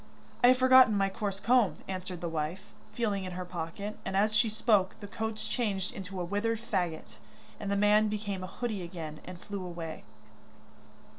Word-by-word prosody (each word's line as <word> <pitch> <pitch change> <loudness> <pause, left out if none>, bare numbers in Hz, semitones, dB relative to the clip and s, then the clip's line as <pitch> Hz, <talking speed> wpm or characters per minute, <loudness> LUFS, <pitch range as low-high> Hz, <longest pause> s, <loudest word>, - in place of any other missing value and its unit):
'I - - +9
have 255 +1 +7
forgotten 255 -4 +7
my 195 0 +2
coarse 195 0 -3
comb,' 225 -6 +3
answered 185 -2 -5
the 175 - -2
wife, 160 +3 -2 0.3
feeling 210 -3 -1
in 185 -1 -5
her 180 0 -4
pocket, 180 +4 -5
and 190 0 -2
as 215 +2 +3
she 215 +1 +4
spoke 210 -3 +2
the 205 - -7
coach 220 +1 -4
changed 200 -6 -1
into 190 -1 -6
a 175 - -1
withered 210 +5 0
faggot, 180 -8 -3 0.4
and 205 - -4
the 200 - +1
man 210 +1 +4
became 205 -3 -3
a - - -4
hoodie 215 -1 -3
again, 165 -3 -6
and 180 -1 -8
flew 200 0 -6
away. 170 -3 -6
200 Hz, 180 wpm, -30 LUFS, 180-215 Hz, 0.4 s, I